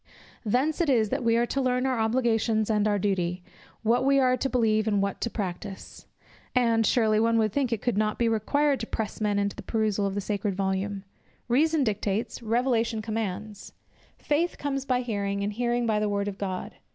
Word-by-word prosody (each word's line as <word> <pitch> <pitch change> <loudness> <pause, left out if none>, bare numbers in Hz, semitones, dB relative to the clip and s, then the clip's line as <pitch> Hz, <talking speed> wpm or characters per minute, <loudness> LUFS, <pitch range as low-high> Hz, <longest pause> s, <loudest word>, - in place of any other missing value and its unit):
Thence 260 - +1
it 330 - +1
is 225 -5 +3
that - - -2
we 230 0 +3
are 240 - +3
to 275 +3 -1
learn 250 0 +1
our 260 -3 0
obligations 225 -1 +1
and 210 -1 +2
our 205 -1 +2
duty, 180 -3 -1 0.4
what 235 +3 +2
we 275 +1 +4
are 255 -1 +4
to 270 - -2
believe 220 -3 +2
and 205 -2 +2
what 200 0 -2
to 235 - 0
practise. 195 -2 -6 0.5
And, 230 -3 +3
surely, 215 -3 +3
one 230 +1 +3
would 215 -2 +1
think 275 -4 0
it 225 -3 -2
could 235 -4 +1
not 215 0 0
be 235 - +2
required 275 +6 +1
to 225 - -4
press 220 -1 -4
men 205 -1 +1
to 200 - -6
the - - -8
perusal 215 -3 0
of 195 - -4
the - - 0
sacred 200 0 -2
volume. 195 +1 -2 0.4
Reason 300 +5 +3
dictates, 210 0 -2
Revelation 230 -1 0
commands; 210 -1 -4 0.4
"Faith 325 +4 0
comes 275 -2 -3
by 250 -2 +1
hearing, 200 -4 -2
and 205 +1 -2
hearing 240 +1 0
by 215 -2 +1
the 210 0 0
word 200 0 -1
of 200 -1 -5
God." 185 -2 -4
220 Hz, 200 wpm, -27 LUFS, 205-245 Hz, 0.5 s, we